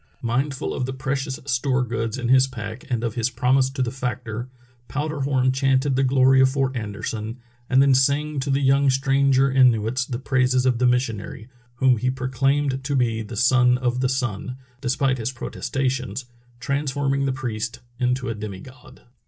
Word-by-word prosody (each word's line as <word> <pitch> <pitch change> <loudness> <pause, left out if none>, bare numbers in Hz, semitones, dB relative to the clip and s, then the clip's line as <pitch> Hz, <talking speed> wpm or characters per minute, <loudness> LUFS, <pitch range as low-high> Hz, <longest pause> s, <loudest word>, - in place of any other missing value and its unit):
Mindful 130 +4 -1
of 125 - -2
the 130 - -4
precious 135 0 -3
store 130 0 +1
goods 115 -1 -3
in 120 -2 -3
his 130 +1 +5
pack 115 -2 -8
and 120 -2 -1
of 115 -2 -1
his 120 +1 0
promise 130 +1 +2
to 135 -1 -2
the 120 - -2
factor. 125 -2 -4 0.4
Powder 150 +1 -3
Horn 135 -2 +2
chanted 135 +1 +1
the 135 - +2
glory 130 0 +4
of 130 - +5
Fort 135 -1 -1
Anderson, 110 +1 -4 0.3
and 130 +1 +5
then 140 -1 +4
sang 140 +3 +1
to 135 +2 -3
the 135 +1 +1
young 135 +1 +4
stranger 135 0 +3
Inuits 125 -2 +3
the 120 - -4
praises 130 -1 +1
of 125 -2 +2
the 125 - +3
missionary, 120 -2 -2 0.3
whom 125 0 +3
he 125 +3 0
proclaimed 135 +2 0
to 140 +1 -1
be 115 -4 +1
the 110 +1 -7
Son 125 +1 +4
of 125 -1 -1
the 130 0 +1
Sun; 125 -2 -3 0.2
despite 135 0 0
his 115 +2 -2
protestations, 130 -1 -3 0.3
transforming 140 -1 -1
the - - +1
priest 120 -3 -4 0.2
into 125 +1 0
a 115 - -1
demi 105 -3 -7
god. 130 -1 -15
130 Hz, 175 wpm, -23 LUFS, 120-135 Hz, 0.4 s, his